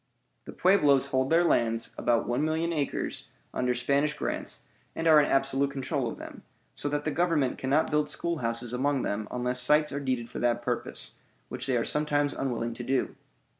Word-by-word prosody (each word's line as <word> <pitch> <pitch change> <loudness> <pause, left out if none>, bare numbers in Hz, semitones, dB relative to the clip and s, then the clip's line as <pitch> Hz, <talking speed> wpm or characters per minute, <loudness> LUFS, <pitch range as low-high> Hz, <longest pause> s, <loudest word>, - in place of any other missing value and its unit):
The - - -8
Pueblos 145 -8 +3
hold 130 0 +1
their 165 +2 +4
lands 115 -8 +1
(about 120 -1 +1
1,000,000 155 +6 0
acres) 145 -2 -2 0.2
under 125 -1 0
Spanish 140 +4 +1
grants, - - -4 0.3
and 165 - -3
are 155 -2 +7
in 145 - 0
absolute 135 0 +2
control 135 -2 -2
of - - -7
them, - - -10 0.3
so 145 - -4
that 145 0 -2
the 155 - 0
Government 155 -4 +1
cannot 140 +4 +1
build 150 -1 +1
schoolhouses 120 -8 -2
among 135 +2 0
them 105 +1 -2
unless 125 0 0
sites 150 +4 +4
are 140 - -3
deeded 130 -4 -2
for - - -7
that 120 0 0
purpose, 120 -1 0 0.3
which - - -5
they 130 -2 +1
are 115 - 0
sometimes 145 -1 +1
unwilling 120 -3 -2
to 120 - -7
do. 130 +2 -1
135 Hz, 180 wpm, -28 LUFS, 125-150 Hz, 0.3 s, are